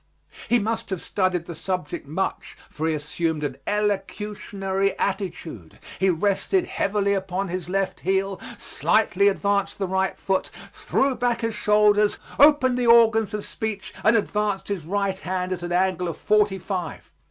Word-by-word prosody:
He 240 - +5
must 225 +1 -2
have 190 -3 -2
studied 185 -3 -1
the 170 - -7
subject 180 -4 -4
much, 185 +6 -3
for 160 +1 -2
he 160 - +1
assumed 155 +1 -2
an 135 -2 -3
elocutionary 200 -1 -1
attitude; 175 - -4 0.2
he 190 - +3
rested 200 - +1
heavily 200 0 0
upon 190 0 -2
his 180 0 -4
left 195 0 -1
heel, 195 0 -1 0.2
slightly 205 -2 +2
advanced 200 0 +1
the 195 - -1
right 190 +1 0
foot, 190 -1 -1 0.2
threw 270 0 0
back 240 -1 0
his 225 -1 -1
shoulders, 210 0 +3 0.2
opened 270 -4 +5
the 245 - +1
organs 225 -3 +5
of 210 - -5
speech, 220 -3 -5
and 215 +3 +5
advanced 210 -2 0
his 180 -6 -3
right 200 0 -1
hand 185 0 -3
at 180 - -5
an 175 0 -5
angle 180 0 +1
of 165 - -4
forty 210 -2 +2
five. 185 -2 -5
195 Hz, 155 wpm, -24 LUFS, 185-210 Hz, 0.2 s, He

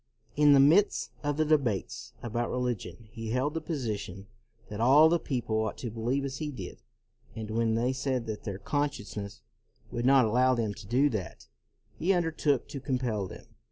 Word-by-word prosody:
In 145 -1 +6
the 140 - +6
midst 165 +9 +4
of 145 -1 -1
the 155 - +2
debates 120 -4 0
about 120 0 -2
religion 120 -2 -3
he 115 -1 -6
held 130 +5 0
the 165 - -3
position 110 - -4 0.4
that 105 +1 -5
all 145 +6 +7
the 170 +1 +2
people 120 -7 -2
ought 110 -1 -1
to 120 - -5
believe 120 +5 -1
as 135 -1 -4
he 150 +1 -3
did, 100 -11 -8 0.5
and 110 -1 -6
when 115 0 +1
they 120 +3 +1
said 130 -2 -2
that 110 -2 -5
their 100 -3 -4
consciences 110 -7 -3 0.5
would 120 +1 -1
not 135 -2 +6
allow 125 +4 +3
them 110 -3 -1
to 105 -1 -12
do 130 +6 +3
that, 105 -8 -5 0.5
he 185 +5 +3
under 175 -3 +1
took 145 -4 0
to 140 - -5
compel 125 -7 -2
them. - - -11
125 Hz, 185 wpm, -29 LUFS, 110-145 Hz, 0.5 s, all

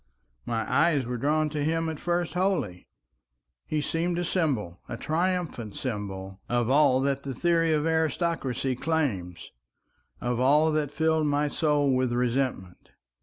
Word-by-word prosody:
My 115 -1 -1
eyes 145 0 +2
were 125 0 -3
drawn 155 +3 +1
to 150 -1 -2
him 165 +2 0
at 160 -2 -4
first 175 -1 -1
wholly. 180 - -1 0.8
He 155 - 0
seemed 170 +3 -1
a 175 - -1
symbol, 130 - -1
a 120 - -4
triumphant 165 - -2
symbol, 95 -5 -5
of 120 0 +1
all 135 -2 +4
that 140 0 0
the 135 -2 -5
theory 165 +2 +2
of 155 -1 +1
aristocracy 160 -5 0
claims, 120 - -2 0.7
of 120 -1 -1
all 150 +5 +4
that 155 -2 0
filled 160 +1 +1
my 145 0 +1
soul 145 -3 +2
with 130 -1 +1
resentment. 125 -6 -2
145 Hz, 145 wpm, -27 LUFS, 120-160 Hz, 0.8 s, all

